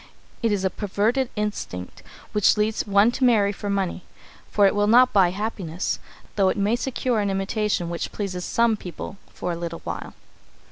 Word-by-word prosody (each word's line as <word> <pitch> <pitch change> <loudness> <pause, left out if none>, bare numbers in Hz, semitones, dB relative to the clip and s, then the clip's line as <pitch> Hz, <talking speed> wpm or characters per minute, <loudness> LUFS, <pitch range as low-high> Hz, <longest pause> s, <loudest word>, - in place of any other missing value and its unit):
It 230 -2 +2
is 195 -2 0
a 190 - +1
perverted 225 +5 0
instinct 210 - -4 0.3
which 210 0 +3
leads 215 +1 0
one 200 +3 +5
to 260 - -3
marry 215 -5 +4
for 205 0 -5
money, 195 -2 -1 0.5
for 205 - +4
it 195 - +4
will 205 0 +2
not 250 +3 +6
buy 190 -4 +5
happiness, 190 -3 -3 0.4
though 195 -2 +4
it - - -1
may 205 +3 +2
secure 250 -2 -1
an 205 -1 0
imitation 195 -1 -1
which 170 0 -4
pleases 185 -3 -4
some 230 +2 +2
people 190 0 -8
for 180 - -4
a - - -2
little 170 0 -5
while. - - -6
205 Hz, 180 wpm, -24 LUFS, 190-220 Hz, 0.5 s, not